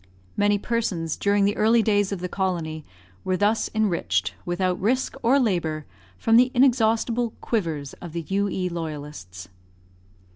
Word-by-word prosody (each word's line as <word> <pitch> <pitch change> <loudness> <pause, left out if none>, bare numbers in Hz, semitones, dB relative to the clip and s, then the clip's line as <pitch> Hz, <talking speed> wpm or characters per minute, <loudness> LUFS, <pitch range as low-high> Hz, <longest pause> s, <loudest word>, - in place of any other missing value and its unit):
Many 205 0 +3
persons, 195 -8 -2
during 200 0 +2
the 205 +1 +1
early 225 +1 +4
days 205 -2 +2
of 195 -3 -4
the 180 - -2
colony, 170 -5 -2 0.4
were 185 0 0
thus 210 +3 +1
enriched, 95 - 0
without 180 +1 -1
risk 255 +6 0
or 255 +4 +4
labour, 165 - -1 0.3
from 225 0 +4
the 250 +1 +5
inexhaustible 235 -2 +2
"quivers" 160 - -2
of 170 -3 -8
the 170 -2 -4
U.E. 195 -1 0
Loyalists. 150 - -7
195 Hz, 140 wpm, -24 LUFS, 165-220 Hz, 0.4 s, the